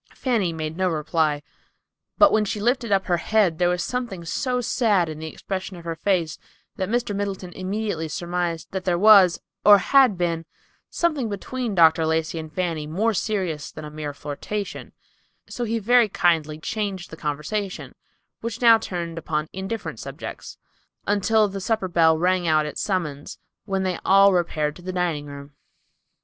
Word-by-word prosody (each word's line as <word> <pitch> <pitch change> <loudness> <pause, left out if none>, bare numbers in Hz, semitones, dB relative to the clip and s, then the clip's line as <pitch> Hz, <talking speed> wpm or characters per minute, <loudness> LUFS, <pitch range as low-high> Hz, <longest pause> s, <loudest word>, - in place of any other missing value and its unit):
Fanny 225 -9 0
made 160 0 -5
no 185 -1 +1
reply; 155 -2 0 0.7
but 305 - +7
when 215 - +3
she 210 +1 -3
lifted 240 +1 0
up 195 -1 +2
her 175 -2 +1
head 180 -2 +1
there 175 0 +3
was 180 -1 0
something 235 -9 -4
so 250 +8 -1
sad 215 -7 +2
in 155 -1 -7
the 160 - -6
expression 190 +3 -5
of 170 - -12
her 165 -1 -3
face 165 -3 0 0.4
that 190 0 -3
Mr. 235 -3 -1
Middleton 195 -3 -4
immediately 190 -3 -3
surmised 175 +1 -3
that 190 -1 -3
there 180 -2 +1
was, 195 -3 +6 0.2
or 205 -1 +9
had 255 0 +4
been, 170 -2 -1 0.4
something 305 -9 0
between 225 +2 -4
Dr. 160 -1 +5
Lacey 160 +1 -1
and 155 -1 -8
Fanny 165 -4 -2
more 210 +9 0
serious 185 -7 -2
than 155 - -9
a 150 - -8
mere 150 -1 -5
flirtation; 150 +8 -6 0.5
so 240 - -4
he 230 +1 -1
very 235 +1 +4
kindly 160 -5 +1
changed 195 +1 -4
the - - -7
conversation, 155 +7 -4 0.5
which 230 0 -5
now 230 -2 +7
turned 170 -5 -5
upon 155 -1 -3
indifferent 195 +4 -5
subjects, - - -8 0.5
until 205 +2 +3
the 195 0 -6
supper 220 -1 0
bell 165 -2 +4
rang 180 +1 +1
out 155 -1 +3
its 150 - -5
summons, 155 -8 -3 0.3
when 195 -2 -1
they 185 -2 -2
all 195 0 +6
repaired 155 -4 0
to - - -13
the 185 +1 -5
dining 170 -5 -1
room. 140 0 -10
185 Hz, 170 wpm, -23 LUFS, 160-210 Hz, 0.7 s, or